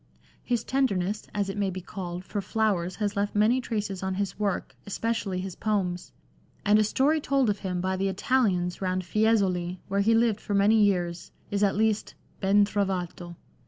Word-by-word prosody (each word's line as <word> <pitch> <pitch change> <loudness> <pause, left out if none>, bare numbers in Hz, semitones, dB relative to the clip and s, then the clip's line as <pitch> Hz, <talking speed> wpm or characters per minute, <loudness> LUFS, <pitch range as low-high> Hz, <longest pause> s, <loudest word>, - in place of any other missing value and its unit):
His 240 -2 0
tenderness, 210 -7 0
as 205 -1 -1
it 195 +1 -4
may 200 -1 +1
be 185 0 -5
called, 180 -1 -6
for 205 - -3
flowers 190 -3 0
has 205 -2 -2
left 205 +1 -1
many 225 +5 +3
traces 210 -6 -3
on 190 0 -2
his 200 +1 -3
work, 200 -3 -2
especially 205 -2 -2
his 190 -1 -6
poems, 190 -5 -1 0.5
and 210 +1 +5
a - - +5
story 285 +8 +2
told 275 -6 +2
of 200 - -4
him 180 -2 -2
by 190 +1 0
the 195 +1 0
Italians 190 -4 +1
round 185 0 -1
Fiesole, 185 -4 +1
where 200 +1 +1
he 225 +3 +4
lived 225 -2 +2
for 205 - -2
many 210 +2 +5
years, 175 -3 0 0.2
is 200 0 0
at 200 - +3
least 215 0 0 0.2
ben 200 +1 +4
trovato. 185 -4 -3
200 Hz, 180 wpm, -27 LUFS, 185-215 Hz, 0.5 s, and